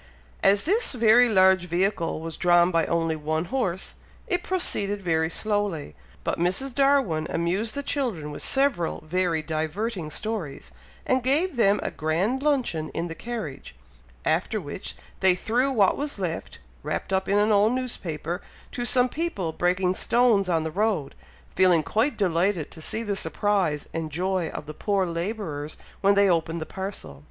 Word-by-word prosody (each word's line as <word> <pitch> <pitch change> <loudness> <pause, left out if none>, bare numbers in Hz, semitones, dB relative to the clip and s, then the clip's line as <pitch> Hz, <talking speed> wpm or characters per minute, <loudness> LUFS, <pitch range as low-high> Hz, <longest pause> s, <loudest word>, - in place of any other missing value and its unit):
As 200 +1 +4
this 420 +4 +2
very 240 0 +5
large 190 -3 +5
vehicle 175 -2 0
was 165 0 -6
drawn 175 0 +4
by 165 -1 +2
only 165 -1 0
one 155 +2 -2
horse, 190 -9 -2 0.3
it 360 0 -1
proceeded 205 - 0
very 160 -4 0
slowly; 205 - -1 0.3
but - - -2
Mrs. 190 +10 0
Darwin 275 - +2
amused 185 +7 -1
the 285 - -3
children 220 - -2
with 145 - -7
several 270 - 0
very 170 -1 0
diverting 160 +4 -3
stories, 155 - -4 0.3
and 255 0 +2
gave 290 +7 +1
them 205 -3 +3
a - - -2
grand 180 - 0
luncheon 255 - 0
in 170 +1 -2
the - - -4
carriage; 210 - -6 0.5
after - - +1
which, - - -7 0.2
they 190 -1 +4
threw 245 +8 0
what 205 -7 +3
was 285 -2 -3
left, 175 -4 -4 0.2
wrapped 195 - -3
up 190 0 0
in 200 - +3
an 210 +1 +3
old 210 +3 +4
newspaper, 180 -9 -3 0.3
to 245 - -3
some 250 0 +3
people 250 - -3
breaking 180 +2 +1
stones 225 -3 +3
on 165 -2 +1
the 160 - -3
road, 200 -6 0 0.4
feeling 180 -4 +4
quite 225 - 0
delighted 180 -3 +1
to 160 - -10
see 220 +7 -2
the 205 -2 -2
surprise 180 -3 0
and 160 -1 -3
joy 180 +1 -1
of - - -7
the 155 - -7
poor 200 +2 0
labourers 170 -4 -4 0.2
when 200 0 +4
they 200 0 +5
opened 165 -2 +1
the 160 - -4
parcel. 190 - -7
190 Hz, 165 wpm, -25 LUFS, 165-225 Hz, 0.5 s, very